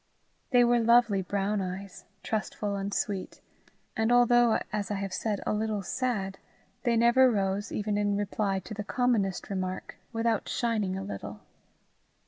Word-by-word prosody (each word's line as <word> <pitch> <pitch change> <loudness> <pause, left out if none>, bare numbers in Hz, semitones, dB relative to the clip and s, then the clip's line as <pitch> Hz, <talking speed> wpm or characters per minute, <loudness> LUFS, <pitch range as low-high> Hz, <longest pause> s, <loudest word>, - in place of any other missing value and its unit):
They 245 -2 +5
were 240 0 +4
lovely 235 -3 +4
brown 200 +2 -1
eyes, 190 +1 -6 0.2
trustful 210 -1 -2
and 200 0 -3
sweet, 195 -1 -3 0.6
and 220 +1 +1
although, 240 -1 +5 0.2
as 205 -2 -2
I 205 - -1
have 195 -1 -4
said, 210 -3 -2
a - - 0
little 215 -1 -1
sad, 195 -4 -2 0.4
they 240 -3 +1
never 240 +3 +6
rose, 200 -1 -1
even 210 0 -1
in 205 -1 +1
reply 205 -1 -1
to 180 - -8
the 210 0 -4
commonest 215 -5 0
remark, 185 -1 -4
without 225 -2 0
shining 215 -6 0
a 195 - -4
little. 105 - -7
205 Hz, 150 wpm, -29 LUFS, 195-230 Hz, 0.6 s, never